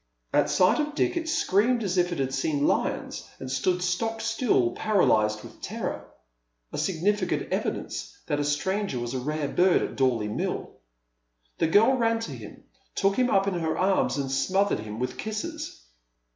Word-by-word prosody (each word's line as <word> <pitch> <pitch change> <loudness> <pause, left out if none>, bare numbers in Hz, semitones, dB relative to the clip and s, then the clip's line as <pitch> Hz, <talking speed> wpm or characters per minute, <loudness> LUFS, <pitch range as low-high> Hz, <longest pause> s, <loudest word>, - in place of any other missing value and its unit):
At 145 0 +3
sight 185 - +4
of 300 -1 -1
Dick 350 - +1
it 330 -1 -2
screamed 235 - +2
as 190 -3 -1
if 180 -1 +2
it 175 - -2
had 135 -1 -1
seen 145 +2 0
lions, - - -1
and 130 -1 -6
stood 180 +7 0
stock 225 +6 -1
still, 225 - +1
paralyzed 110 - +2
with - - -13
terror - - -4 0.3
— - - -38
a - - -2
significant 190 +2 0
evidence - - -3
that 145 -2 -1
a - - +1
stranger 190 +3 -1
was 120 +1 -4
a 130 - -1
rare 150 +3 -2
bird 180 +5 +3
at - - -4
Dorley 125 -5 +1
Mill. 105 - -3 0.9
The - - +3
girl 225 +10 +5
ran 230 -1 +2
to 225 - -5
him, - - -10 0.3
took 195 0 +2
him 250 -1 +2
up 195 -2 +3
in 200 - 0
her 165 -2 -1
arms, 185 -9 +2
and 135 -2 -2
smothered 190 - +1
him 105 0 -6
with 125 +2 -3
kisses. 215 - -5
180 Hz, 180 wpm, -27 LUFS, 135-210 Hz, 0.9 s, girl